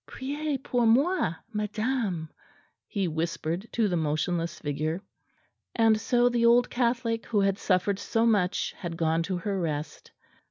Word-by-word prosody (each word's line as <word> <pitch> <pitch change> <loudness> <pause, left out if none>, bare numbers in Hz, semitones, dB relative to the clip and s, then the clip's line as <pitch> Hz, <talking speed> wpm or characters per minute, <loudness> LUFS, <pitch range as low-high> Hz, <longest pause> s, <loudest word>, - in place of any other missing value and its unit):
"Priez 290 +2 -3
pour 245 -4 +1
moi, 265 - +3 0.2
madame," 210 -4 -1 0.6
he 195 -3 -1
whispered 165 +4 -2
to 225 -3 +2
the 180 - 0
motionless 165 +2 -1
figure. 155 +5 -3 0.7
And 225 -2 +4
so 245 -1 +3
the 240 -1 +1
old 240 +1 +4
Catholic 235 -2 0
who 210 -3 +2
had 195 0 +1
suffered 190 +1 +1
so 225 0 +1
much 205 -5 +1
had 170 -3 -5
gone 165 0 +1
to 180 +2 -2
her 195 +1 -2
rest. 150 -2 -4
200 Hz, 145 wpm, -27 LUFS, 170-235 Hz, 0.7 s, And